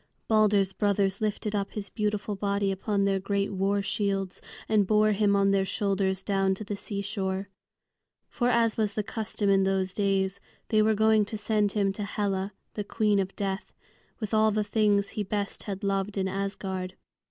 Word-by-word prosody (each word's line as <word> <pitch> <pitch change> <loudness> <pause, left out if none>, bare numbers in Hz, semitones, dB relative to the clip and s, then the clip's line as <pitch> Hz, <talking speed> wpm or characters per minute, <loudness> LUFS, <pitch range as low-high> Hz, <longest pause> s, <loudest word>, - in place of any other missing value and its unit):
Balder's 205 -3 +3
brothers 200 -1 +1
lifted 210 0 -1
up 200 -1 -2
his 205 -2 -5
beautiful 210 -1 -1
body 200 0 0
upon 200 +1 0
their 195 -1 +2
great 200 +1 -1
war 195 +1 +1
shields 195 -2 -1 0.3
and 210 -3 +3
bore 215 +1 +4
him 205 -1 +3
on 195 0 +3
their 195 -1 +3
shoulders 195 -1 -1
down 195 -1 +1
to 215 - -7
the 205 0 -4
seashore. 200 -1 -3 0.8
For, 245 -1 0
as 230 -2 +2
was 210 -2 0
the 215 - 0
custom 220 -1 -3
in 195 0 +4
those 190 -1 0
days, 195 -1 0 0.3
they 215 -1 +4
were 215 0 +3
going 220 0 +4
to 215 - -5
send 210 -1 +1
him 200 -2 +1
to 205 - -4
Hela, 200 -1 -2 0.2
the 210 - -3
Queen 210 -1 +1
of 195 0 -2
Death, 195 -1 -4 0.4
with 215 -2 -4
all 220 0 +5
the 215 0 +1
things 205 -1 +2
he 215 - -3
best 205 0 -3
had 195 +1 -4
loved 195 +1 -1
in 190 -1 +1
Asgard. 190 -1 -3
200 Hz, 180 wpm, -28 LUFS, 195-210 Hz, 0.8 s, all